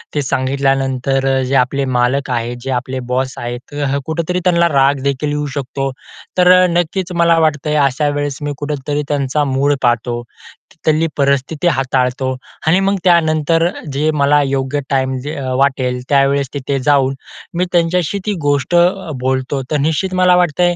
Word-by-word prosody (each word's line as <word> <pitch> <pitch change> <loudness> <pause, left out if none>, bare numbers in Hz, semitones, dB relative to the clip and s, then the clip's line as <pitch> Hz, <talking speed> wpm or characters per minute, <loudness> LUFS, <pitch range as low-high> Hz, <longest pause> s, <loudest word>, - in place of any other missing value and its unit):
ते 145 - +1
सांगितल्यानंतर 135 0 0 0.2
जे 135 +2 -1
आपले 135 +2 +1
मालक 130 +2 0
आहेत, 120 0 -2
जे 135 +1 -4
आपले 130 +1 -2
बॉस 130 0 0
आहेत 120 0 -4
तर 140 -1 -1
कुठेतरी 170 +3 -2
त्यांना 170 -2 +3
रागदेखील 140 +1 +1
येऊ 150 0 -2
शकतो. 135 0 -3 0.5
तर 180 0 +6
अ, - - +5
नक्कीच 175 +2 -1
मला 170 -1 +4
वाटतंय, 150 -1 0
अशा 140 +2 0
वेळेस 145 -1 -2
मी 145 0 -3
कुठेतरी 145 0 -3
त्यांचा 145 +1 0
मूड 140 +1 +1
पाहतो, 120 -1 0
की 120 - -21
तिथली 155 +1 +2
परिस्थिति 140 +4 0
हाताळतो 130 -2 0 0.3
आणि 180 +4 +4
मग 195 +1 +1
त्यानंतर 165 -1 +3 0.2
जे 150 +3 +1
मला 145 +1 +4
योग्य 135 +1 -1
टाईम 130 -1 0
जे 150 +2 -5
अ, 135 -2 -4
वाटेल, 130 -2 -1
त्यावेळेस 140 -1 +2
तिथे 140 0 -2
जाऊन, 135 -2 +3 0.4
मी 180 - +1
त्यांच्याशी 175 +2 +1
ती 210 - 0
गोष्ट 145 +2 0
अ, 175 -1 +2
बोलतो. 130 +1 -1
तर 150 - +2
निश्चित 185 +4 -1
मला 185 -1 +4
वाटतंय, 175 0 +2
140 Hz, 160 wpm, -16 LUFS, 130-160 Hz, 0.5 s, तर